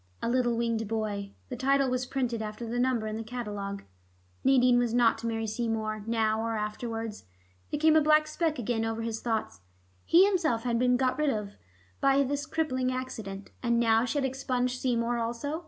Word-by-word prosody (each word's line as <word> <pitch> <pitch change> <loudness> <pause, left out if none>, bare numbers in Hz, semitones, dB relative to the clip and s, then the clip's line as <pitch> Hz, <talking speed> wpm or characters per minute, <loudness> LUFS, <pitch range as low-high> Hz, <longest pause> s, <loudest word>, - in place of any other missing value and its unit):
A - - -3
little 240 -1 +1
winged 230 -2 -1
boy.... 205 -2 -3 0.2
The 250 - -4
title 275 +2 +2
was 255 0 -1
printed 245 -4 -1
after 215 +2 -5
the 235 +2 -2
number 250 -3 +1
in 215 0 -3
the 225 - -4
catalogue. 205 -4 -5 0.6
Nadine 250 -2 +5
was 240 -1 0
not 240 -2 +4
to 230 - -4
marry 225 -1 -1
Seymour 220 -2 -2
now 220 -1 +1
or 225 0 -1
afterwards.... 225 +1 -4 0.4
There 295 - -2
came 315 0 +5
a 315 - +6
black 305 0 +5
speck 310 0 -1
again 235 -1 -1
over 225 0 -2
his 225 -1 -3
thoughts. 220 - -2 0.4
He 360 +3 +6
himself 330 - +1
had 235 -2 0
been 250 0 +3
got 255 +2 0
rid 300 -1 +2
of 210 -5 -3 0.5
by 275 0 +4
this 285 +2 -2
crippling 260 -6 0
accident, 220 -6 -6
and 235 -1 +2
now 225 -1 +4
she 250 +3 -1
had 275 - +1
expunged 255 -1 -1
Seymour 240 -1 0
also. 240 +7 -3
235 Hz, 190 wpm, -29 LUFS, 225-260 Hz, 0.6 s, a